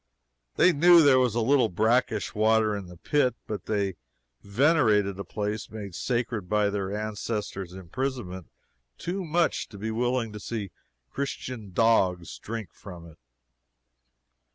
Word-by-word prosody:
They 180 - +5
knew 170 +2 +7
there 135 -3 +6
was 125 -4 +1
a 120 - +1
little 125 0 +3
brackish 110 +3 +1
water 110 0 +3
in 100 -3 -6
the 90 0 -12
pit, 130 - +1
but 105 -4 -6
they 100 -4 -1 0.4
venerated 105 - +2
a - - -3
place 105 +1 -4
made 105 -4 -7
sacred 115 -4 -2
by 105 -1 +2
their 100 -1 -3
ancestor's 105 -3 -4
imprisonment 95 - -5 0.5
too 185 +3 -3
much 170 +1 0
to 105 - -11
be 110 +3 -3
willing 120 -1 -1
to 105 - -7
see 105 -2 -5 0.4
Christian 125 -6 -5
dogs 95 -5 +2
drink 110 -5 -6
from 90 -4 -11
it. - - -22
110 Hz, 140 wpm, -27 LUFS, 100-125 Hz, 0.5 s, knew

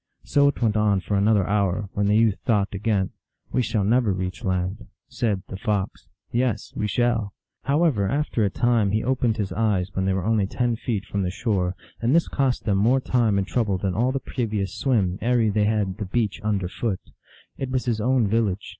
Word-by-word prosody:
So 140 0 +3
it 140 - 0
went 110 -2 +2
on 105 -2 +3
for 100 +3 -2
another 100 -1 +3
hour, 100 -1 0
when 100 0 0
the 105 +1 +4
youth 110 -3 +3
thought 105 -4 +1
again, 100 -1 0 0.2
" - - -43
We 125 - +2
shall 110 -4 0
never 115 +1 +3
reach 95 -1 -4
land." 95 +3 -2 0.2
Said 115 -7 -1
the 95 - -6
Fox, 105 -2 -2
" - - -48
Yes, 120 -3 -1
we 105 - -1
shall." 115 -3 0 0.3
How 145 +5 +2
ever, 105 - +2
after 145 -5 0
a 100 - +2
time 115 -2 +1
he 110 - +1
opened 125 -2 +1
his 100 -3 -2
eyes, 100 -4 0
when 95 - -1
they 95 - +1
were 95 -1 -2
only 110 -3 +2
ten 120 +2 0
feet 110 -3 -3
from 100 - -2
the 90 - 0
shore, 95 -2 -1 0.3
and 120 +6 +2
this 170 - +3
cost 135 -3 0
them 100 -3 +2
more 120 +6 +4
time 120 -5 +1
and 95 - +1
trouble 105 -3 0
than 95 0 -2
all 120 +7 +1
the 135 - -1
previous 105 -8 -3
swim 100 -9 0
ere 120 -2 +2
they 105 0 +2
had 105 -3 0
the 105 - -2
beach 105 +1 -1
under 100 -4 0
foot. 95 0 -3 0.6
It 135 - -3
was 130 -1 -1
his 115 -3 0
own 125 -1 +2
village. 105 -2 0
105 Hz, 215 wpm, -24 LUFS, 100-120 Hz, 0.6 s, the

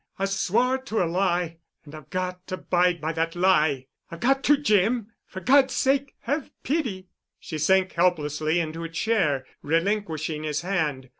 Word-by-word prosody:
I 195 - 0
swore 220 +7 +1
to 225 -6 -1
a - - +1
lie. 175 -1 0 0.3
And 145 - -13
I've 155 -3 -11
got 185 0 -4
to 185 - -3
abide 180 -1 +1
by 160 +1 -2
that 165 +1 -1
lie. 155 -7 +2 0.2
I've 170 - -9
got 270 +2 +2
to, 295 - +5
Jim. 225 -3 +1 0.2
For 190 - -8
God's 265 0 +4
sake, 275 0 +1
have 285 0 -2
pity." 235 - -2 0.3
She 155 - -6
sank 190 +4 +3
helplessly 155 -2 +1
into 165 0 -3
a 165 - -5
chair, 165 -7 0 0.2
relinquishing 165 -2 -1
his 155 0 -2
hand. 155 -8 -2
180 Hz, 165 wpm, -25 LUFS, 160-215 Hz, 0.3 s, to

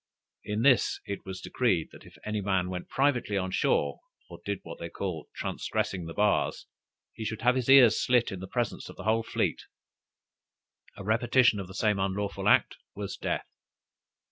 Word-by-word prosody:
In 105 +2 -2
this 130 -2 +4
it 100 -1 -6
was 95 -1 -6
decreed, 95 -11 0
that - - -14
if - - -16
any 105 -1 -2
man 95 -2 0
went 90 -1 -6
privately 130 -7 +1
on 95 -1 -2
shore, 70 -6 +1 0.3
or - - -9
did 100 -2 -3
what 85 - -9
they 85 - -5
called 85 -4 -5
"transgressing 90 -3 -3
the 80 - -8
bars," 105 0 +1 0.5
he 110 - -7
should 110 0 -4
have 125 +1 +5
his 130 -1 -2
ears 130 -5 +7
slit 125 -1 +3
in 95 - -5
the 95 - -7
presence 120 +2 -3
of - - -10
the - - -9
whole 110 +1 +2
fleet; - - -1 1.4
a - - -7
repetition 115 +1 +3
of 95 - -5
the 95 - -11
same 105 -1 +1
unlawful 100 +1 -1
act, - - +4 0.2
was 100 -1 -5
death! - - -2
105 Hz, 180 wpm, -28 LUFS, 95-115 Hz, 1.4 s, ears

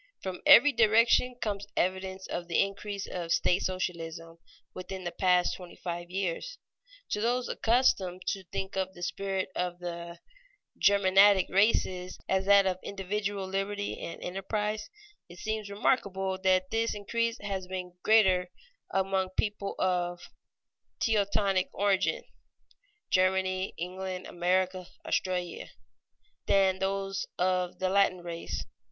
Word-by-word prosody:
From 185 -2 -5
every 295 -1 +9
direction 230 +2 +4
comes 205 -3 -3
evidence 190 +1 -1
of 175 0 -5
the 170 - +1
increase 200 0 -2
of 170 -2 -5
state 180 +3 +2
socialism 165 -3 -4 0.3
within 185 +1 -7
the 175 - -3
past 180 -1 +2
twenty 180 -2 -11
five 175 -1 -5
years. 195 - -3 0.5
To 210 - 0
those 245 +2 +1
accustomed 195 -7 +1
to 195 -2 -3
think 190 +2 -5
of 190 0 -2
the 175 - -8
spirit 195 +1 -2
of 180 -1 -2
the 170 -1 -6 0.6
Germanic 195 -1 +5
races 185 -2 +1
as 190 0 +1
that 200 -1 +7
of 185 -1 0
individual 200 0 -3
liberty 195 +2 -3
and 170 - -6
enterprise, 210 +3 -3 0.4
it 175 - -12
seems 215 +1 -3
remarkable 195 -3 0
that 185 -1 +2
this 225 0 0
increase 230 +3 -1
has 195 -2 -4
been 180 -1 -5
greater 190 -5 +4 0.4
among 190 -1 0
people 205 -2 -1
of 175 -1 0 0.8
Teutonic 200 -3 +1
origin 200 - +1 0.9
(Germany, 185 0 +1
England, 185 +1 -5
America, 185 +1 0 0.2
Australia) 180 -2 -2 0.8
than 190 -1 +4
among - - -17
those 195 0 -2
of 180 0 0
Latin 185 -1 +2
race. 170 -1 -5
190 Hz, 125 wpm, -29 LUFS, 180-200 Hz, 0.9 s, every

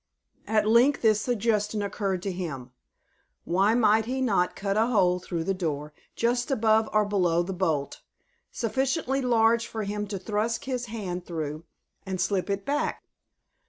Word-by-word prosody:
At 215 -1 +2
length 245 +6 +4
this 215 -2 +4
suggestion 215 -3 0
occurred 195 -2 -2
to 195 - -2
him: 150 -9 -5 0.7
Why 195 +6 +2
might 220 -2 +4
he 260 +3 -2
not 200 -8 +1
cut 195 0 -2
a 220 +2 +3
hole 180 -7 +3
through 170 -2 -4
the 195 - 0
door, 150 -5 -3 0.2
just 240 +3 0
above 220 -4 +2
or 215 0 +3
below 180 -4 +1
the 190 +2 -4
bolt, 160 -6 -1 0.5
sufficiently 265 +3 -1
large 230 -2 +3
for 220 -1 -4
him 210 +1 -3
to 200 -1 -4
thrust 215 +6 -2
his 250 -2 -3
hand 185 -6 -5
through, 155 -1 -4 0.4
and 190 -1 -4
slip 195 0 0
it 200 0 -2
back? 290 +1 -1
210 Hz, 160 wpm, -27 LUFS, 180-230 Hz, 0.7 s, length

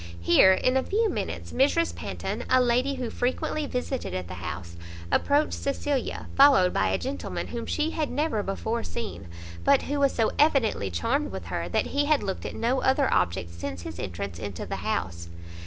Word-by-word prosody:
Here, 135 - +6
in 255 +7 +2
a - - +3
few 440 +1 +1
minutes, - - -4
Mrs 290 +5 +2
Panton, - - -4
a 255 - +5
lady 250 +3 +2
who 250 -3 -4
frequently 270 +4 -1
visited 250 0 -3
at 90 -1 -4
the 90 - -7
house, 85 0 -6 0.4
approached 290 +2 +2
Cecilia, 280 -1 -2
followed 270 -10 +6
by 95 - +2
a 95 0 +1
gentleman, 90 0 -4
whom 235 -1 -5
she 310 +1 0
had 310 -3 -1
never 290 -5 0
before 220 +4 -2
seen, 220 - -6 0.4
but - - +4
who 290 +1 -2
was 280 -1 +4
so 225 -2 +2
evidently 265 - +3
charmed 90 +3 -1
with 95 -2 -6
her, 85 +1 -2
that - - +1
he 285 +1 +2
had 300 -1 +2
looked 190 - -3
at - - -7
no 250 +3 0
other 265 +1 +2
object 85 -1 0
since 85 +1 -6
his 80 +1 -7
entrance 90 -1 -5
into 100 -5 -5
the - - -4
house. 85 0 -3
230 Hz, 190 wpm, -26 LUFS, -, 0.4 s, Here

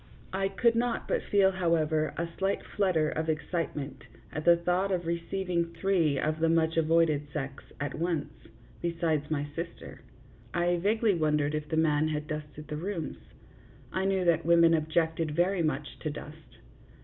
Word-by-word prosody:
I 195 0 +1
could 230 +4 +2
not 235 0 -1
but - - +1
feel, 195 -1 +3
however, 160 -4 +1
a 170 - -1
slight 195 +1 0
flutter 180 -7 +2
of 160 +1 -2
excitement 155 -3 -3 0.3
at 155 - -4
the 170 0 +7
thought 180 +3 0
of 175 -2 -1
receiving 170 0 -2
three 165 -5 +2
of 155 +3 -1
the 165 0 +3
much 165 0 +2
avoided 160 -2 +3
sex 135 -2 -5 0.2
at 145 -1 -3
once, 165 -2 -2 0.5
besides 165 -3 0
my 145 -2 -1
sister. 170 0 -7 0.5
I 175 +1 +2
vaguely 215 +4 +2
wondered 150 -3 +1
if 150 -1 -3
the 160 - -1
man 155 -1 +3
had 150 -1 -2
dusted 150 -1 -6
the 150 0 -4
rooms. 165 - -4 0.7
I 190 0 0
knew 190 -2 +1
that 170 -2 +3
women 170 0 +5
objected 160 -1 0
very 180 +2 +2
much 150 -2 -2
to 155 - -3
dust. 150 +1 -10
165 Hz, 160 wpm, -29 LUFS, 155-175 Hz, 0.7 s, the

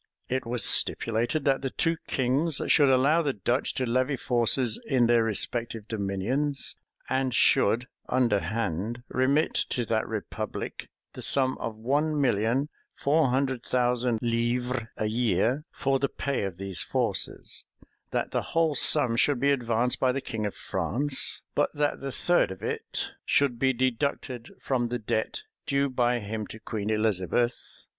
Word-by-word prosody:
It 130 -1 -2
was 120 0 0
stipulated, 120 +6 +2
that 135 -1 +2
the 135 - -2
two 165 +5 +1
kings 135 +4 +1
should 145 -3 +5
allow 140 +6 +4
the 145 -4 0
Dutch 120 +5 -1
to 130 - 0
levy 130 +3 +1
forces 120 -1 +1
in 130 -4 +3
their 120 -1 +4
respective 115 0 -1
dominions; 115 +8 -1 0.3
and 130 0 0
should 115 +3 +3 0.2
underhand 115 -1 0
remit 135 +4 +2
to 120 -3 0
that 110 0 0
republic 110 -1 -5 0.2
the - - -8
sum 130 -1 +3
of 115 -2 -4
one 145 +7 0
million 125 +2 +1 0.3
four 150 +1 +2
hundred 130 -1 0
thousand 125 -2 0
livres 120 +1 0
a 110 - -1
year, 120 - +1
for 135 0 0
the 140 0 0
pay 140 -7 -2
of 95 -3 -5
these 95 -2 -3
forces: - - 0 0.4
that - - -2
the - - 0
whole 165 -2 +1
sum 130 -3 +4
should 135 +2 +2
be 140 +2 +3
advanced 120 -2 +1
by 130 - +3
the 135 - -2
king 110 -5 -3
of 100 - -6
France; 135 +4 -2
but 145 - +2
that 145 0 0
the 135 0 -5
third 175 +6 +2
of 95 -1 -9
it - - -3
should 135 -4 +2
be 130 0 +3
deducted 130 -1 -2
from 125 -3 0
the 125 +1 -2
debt 110 -1 -2 0.2
due 140 0 +1
by 125 -1 +2
him 110 -1 -5
to 110 - -9
Queen 110 -2 -4
Elizabeth. 110 +2 -1
125 Hz, 155 wpm, -27 LUFS, 115-135 Hz, 0.4 s, should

